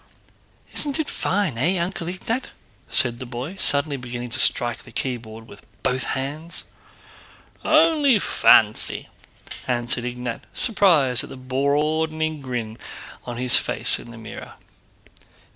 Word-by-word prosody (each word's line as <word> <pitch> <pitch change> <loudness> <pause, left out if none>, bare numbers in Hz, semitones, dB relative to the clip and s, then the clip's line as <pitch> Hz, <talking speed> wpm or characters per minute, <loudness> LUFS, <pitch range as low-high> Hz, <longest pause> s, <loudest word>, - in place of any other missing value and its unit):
"Isn't 285 -1 +1
it 310 - -1
fine, 185 - -1
eh, 175 +8 +2
Uncle 175 0 -2
Ignát?" 225 +8 -3 0.4
said 120 -1 +2
the 130 - -6
boy, 125 +9 -6
suddenly 145 -4 +2
beginning 120 -1 -6
to 120 - -2
strike 120 -2 +1
the - - -15
keyboard 115 -4 -4
with - - -14 0.2
both 130 0 +1 0.2
hands. 150 +5 -5 1.0
"Only 310 -5 +4
fancy!" 110 - +4 0.6
answered 120 -1 0
Ignát, 125 -1 -4
surprised 165 - +3
at - - -9
the - - -9
broadening 150 +4 0
grin 120 -4 -5 0.5
on 120 -1 -5
his 125 0 +5
face - - 0
in - - -11
the 120 - -11
mirror. 110 -1 -9
135 Hz, 125 wpm, -23 LUFS, 120-170 Hz, 1.0 s, his